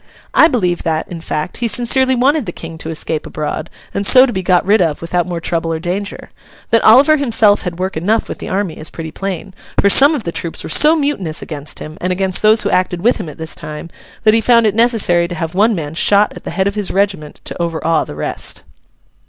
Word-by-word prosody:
I 315 - +6
believe 180 - -1
that, 160 -1 -2
in 170 -2 -7
fact, 155 +1 -4
he 240 - -1
sincerely 260 +3 +2
wanted 270 0 +1
the - - -3
King 165 -1 -9
to 160 - -6
escape 160 -1 -3
abroad, 155 +1 -4 0.2
and 200 - -2
so 255 +6 +7
to 245 - -4
be 190 - -2
got 180 -1 +2
rid 205 +2 +3
of 160 -4 0
without 175 +1 -2
more 175 -2 -4
trouble 165 0 -2
or 160 - -1
danger. 190 +4 -5 0.4
That 230 -1 +4
Oliver 275 +8 +6
himself 225 -7 +3
had 175 -2 -5
work 185 +1 -3
enough 205 +8 0
with - - -7
the - - -7
army 190 -4 -2
is 155 - -6
pretty 160 -1 -7
plain; 195 +1 -5 0.3
for 200 - +4
some 285 +7 +6
of 260 - -4
the 170 - -4
troops 165 0 -5
were - - -7
so 310 +2 +5
mutinous 280 - -1
against 150 -2 -6
him, 155 +1 -9
and 180 - -1
against 190 0 -1
those 215 +1 +4
who - - -1
acted 180 -1 0
with 240 +3 +3
him 190 -7 -6
at - - -11
this 160 0 -6
time, 155 +1 -9 0.3
that 215 -1 +5
he 225 - +3
found 235 0 +4
it 210 - +2
necessary 215 -7 +2
to 175 - -6
have 165 0 -4
one 215 +4 +2
man 155 -3 -5
shot 200 +5 +2
at - - -11
the - - -4
head 190 - -1
of 200 - -1
his 205 -2 -3
regiment 190 -6 -2
to - - -6
overawe 165 -1 0
the - - -9
rest. 75 - -5
185 Hz, 240 wpm, -16 LUFS, 165-220 Hz, 0.4 s, so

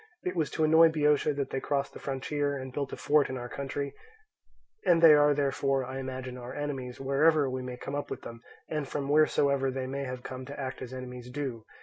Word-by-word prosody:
It 180 - -2
was 160 -4 0
to 160 - 0
annoy 160 +1 +7
Boeotia 150 -1 +2
that 140 -1 -2
they 135 - -1
crossed 140 0 -1
the - - -9
frontier 140 +1 -2
and 130 -1 -7
built 140 -1 -3
a - - -5
fort 150 -1 +3
in 130 - -3
our 120 -1 -5
country; 140 +2 -4 0.9
and 170 -2 +4
they 165 -2 +9
are 145 0 +5
therefore, 135 -1 +1
I 130 +1 -5
imagine, 130 -1 -5
our 120 +1 -8
enemies 135 -4 -4
wherever 140 +2 +3
we 130 0 -3
may 125 -1 -6
come 135 - -6
up 145 0 -3
with - - -6
them, 115 0 -9 0.3
and 150 -3 -3
from 140 0 -3
wheresoever 140 -2 +3
they 130 0 -3
may 135 +1 -3
have 125 -1 -6
come 130 0 -6
to 140 0 -8
act 130 -2 -4
as 130 -1 -6
enemies 125 -1 -7
do. 125 -4 -4
140 Hz, 225 wpm, -29 LUFS, 130-145 Hz, 0.9 s, they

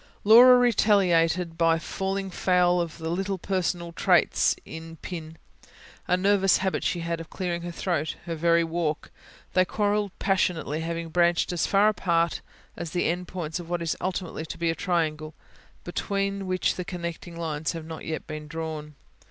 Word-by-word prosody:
Laura 245 +4 +9
retaliated 180 -8 +3
by 165 -1 +4
falling 195 +3 -3
foul 180 -1 +2
of 170 -1 -5
little 185 +4 -2
personal 175 -2 -2
traits - - +3
in 160 +2 -9
Pin: 165 -3 -7 0.7
a 180 - +3
nervous 195 0 +3
habit 190 0 -1
she 175 - -1
had 165 0 -2
of 165 - -9
clearing 175 -2 -3
her 175 - -5
throat 170 -3 -2
her 170 - -3
very 170 +1 +3
walk. 165 -2 -2 0.4
They 185 - +5
quarrelled 205 +1 0
passionately, 170 -5 0
having 165 0 -4
branched 175 +1 +2
as 175 - 0
far 200 +1 +4
apart 170 -5 +1 0.3
as 170 - -5
the 175 +2 -1
end 180 +1 -2
points 170 -2 -4
of 170 -1 -9
what 175 -1 -1
is 165 - -1
ultimately 180 -3 -3
to - - -7
be 170 0 +1
a - - -1
triangle, 155 -4 -1 0.5
between 195 +2 -2
which 185 0 0
the 180 - -2
connecting 170 -2 -6
lines 160 -1 -2
have 165 -2 -6
not 160 0 -8
yet 160 0 -4
been 155 -1 -7
drawn. 155 -2 -6
170 Hz, 165 wpm, -26 LUFS, 165-185 Hz, 0.7 s, Laura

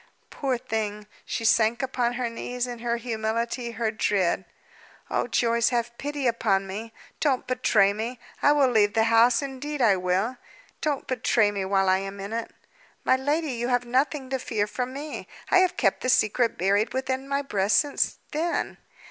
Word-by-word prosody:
Poor 265 -3 -1
thing! 215 -4 -3 0.2
She 230 - -3
sank 230 +2 +3
upon 245 -2 0
her 245 0 -2
knees, 245 +1 -3
in 245 -1 -6
her 235 0 -1
humility, 230 +1 -2
her 225 -1 -1
dread. 190 -4 0 0.7
"Oh, - - 0
Joyce, 235 0 +2
have 240 -1 -1
pity 290 -1 -3
upon 215 -5 +2
me! 215 +4 -6 0.3
don't 275 -4 +1
betray 220 -6 +3
me! 225 +3 -4 0.2
I 290 - +5
will 280 -3 +4
leave 210 -2 +3
the 220 - +4
house; 230 +3 +4
indeed 280 +2 -5
I 215 -6 +4
will. 185 +7 0 0.4
Don't 295 -3 -1
betray 225 -4 +2
me 200 -2 -3
while 195 0 +2
I 185 0 +4
am 195 +1 -6
in 200 +3 -6
it!" 230 0 -3 0.5
"My - - +4
lady, 290 +3 0
you 240 -1 -2
have 245 -1 +1
nothing 265 +2 0
to 265 - 0
fear 220 -4 -1
from 250 +4 -4
me. 290 +3 -6 0.2
I 370 - +7
have 370 -1 +2
kept 195 -6 +2
the 255 - -1
secret 230 0 +2
buried 205 +6 +1
within 260 +1 -2
my 280 0 0
breast 205 -6 +2
since 290 -2 +1
then. 330 +3 -2
235 Hz, 180 wpm, -26 LUFS, 215-260 Hz, 0.7 s, I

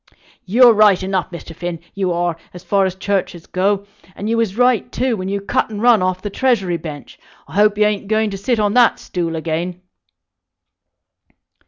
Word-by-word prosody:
You're 235 +5 +6
right 205 -3 +4
enough, 190 -1 -1
Mr. 170 -2 -10
Finn, 175 0 -5
you 190 -2 -1
are, 175 -1 -1 0.2
as 180 - -10
far 195 0 +2
as 185 - -5
churches 190 -3 -2
go, 200 +2 0 0.3
and 205 - -5
you 230 - +1
was 225 -3 -1
right, 245 -2 +2
too, 255 -1 0
when 185 -2 -5
you 200 0 -1
cut 200 - -1
and 210 -2 -6
run 235 -2 +4
off 185 0 -1
the 205 - -4
Treasury 195 -9 +1
Bench. 150 -3 -9 0.3
I - - -14
hope 210 +1 +3
you 210 - +4
ain't 210 -1 -1
going 215 0 +1
to 195 - -5
sit 230 +3 0
on 205 -1 +1
that 245 -1 +4
stool 170 -2 -4
again." 165 +2 -3
195 Hz, 190 wpm, -18 LUFS, 180-215 Hz, 0.3 s, You're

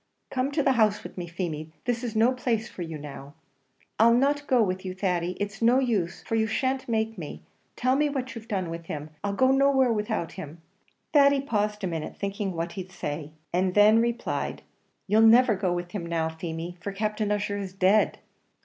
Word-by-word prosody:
"Come 260 +2 0
to 295 -1 +1
the 270 - +4
house 215 -4 +2
with - - -9
me, 175 -2 -5
Feemy; 165 -3 -4 0.2
this 245 0 -1
is 230 -2 -4
no 225 +3 +4
place 240 -3 -1
for 185 - -9
you 165 -2 -5
now." 145 0 -9 0.6
"I'll 235 +1 +6
not 285 +3 +1
go 250 -4 +4
with 185 -2 -2
you, 185 -1 -5
Thady. 180 -2 0
It's 205 +1 -4
no 235 +2 +5
use, 215 -10 0
for - - -6
you 220 -1 +2
shan't 260 +4 -1
make 220 -2 -1
me; 150 -3 -7 0.3
tell 255 +1 +2
me 295 +1 +2
what 260 -3 -3
you've 230 -1 -9
done 185 -6 -2
with 165 0 -7
him 150 0 -5
I'll 200 0 -1
go 260 +5 +4
nowhere 270 -2 +4
without 210 -5 -2
him." 155 +3 -9 0.5
Thady 280 -1 +6
paused 210 -5 -1
a - - +1
minute, 165 -3 -4
thinking 200 -1 -3
what 165 +2 -2
he'd 185 -2 -7
say, 155 -3 -5 0.2
and 185 +1 +1
then 210 +2 +7
replied: 235 0 -2 0.4
"You'll 210 +3 +4
never 230 +1 +7
go 185 -2 -1
with 175 0 -3
him 175 -4 -4
now, 165 -1 0
Feemy, 165 +1 -6
for 200 +3 -4
Captain 210 +1 -1
Ussher 205 0 -1
is 195 -2 -5
dead!" 195 +3 +3
205 Hz, 205 wpm, -27 LUFS, 175-235 Hz, 0.6 s, then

